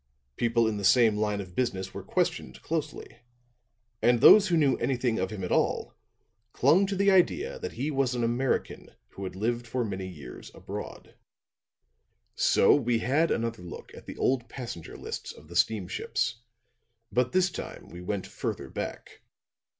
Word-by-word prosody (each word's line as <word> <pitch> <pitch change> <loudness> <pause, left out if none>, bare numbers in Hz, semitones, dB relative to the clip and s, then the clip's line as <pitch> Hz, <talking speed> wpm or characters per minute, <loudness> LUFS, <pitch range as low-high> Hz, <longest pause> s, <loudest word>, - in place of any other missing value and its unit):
People 115 -1 +2
in 110 -1 -1
the 100 - -5
same 110 +1 +5
line 105 -1 0
of 90 -2 -10
business 95 -7 -2
were - - -6
questioned 65 - -2
closely; 150 -7 -4 0.8
and 120 0 +4
those 210 - +8
who 170 - +2
knew 145 -4 +3
anything 125 -2 0
of 95 0 -1
him 100 -2 -6
at 90 - -3
all - - +1 0.6
clung 165 +10 +4
to 195 - -2
the 200 +1 +3
idea 395 - +2
that 455 -2 -5
he 155 - -2
was 135 -3 0
an 120 - -1
American 120 +3 -1
who 100 - -9
had 95 - -6
lived 120 +4 -2
for 125 0 -1
many 95 -2 -4
years 75 -9 -10
abroad. - - -8 1.2
"'So - - +4
we 120 -4 +2
had 140 +8 +2
another 115 -3 -1
look 90 - -10
at - - -13
the - - -8
old 125 -3 0
passenger 115 -12 -7
lists - - -6
of 75 - -16
the 85 - -10
steamships; 110 +4 0 0.7
but 125 0 +1
this 185 0 +2
time - - -7
we 90 - -9
went 95 +1 -3
further - - -5
back. - - -6
120 Hz, 165 wpm, -28 LUFS, 100-135 Hz, 1.2 s, those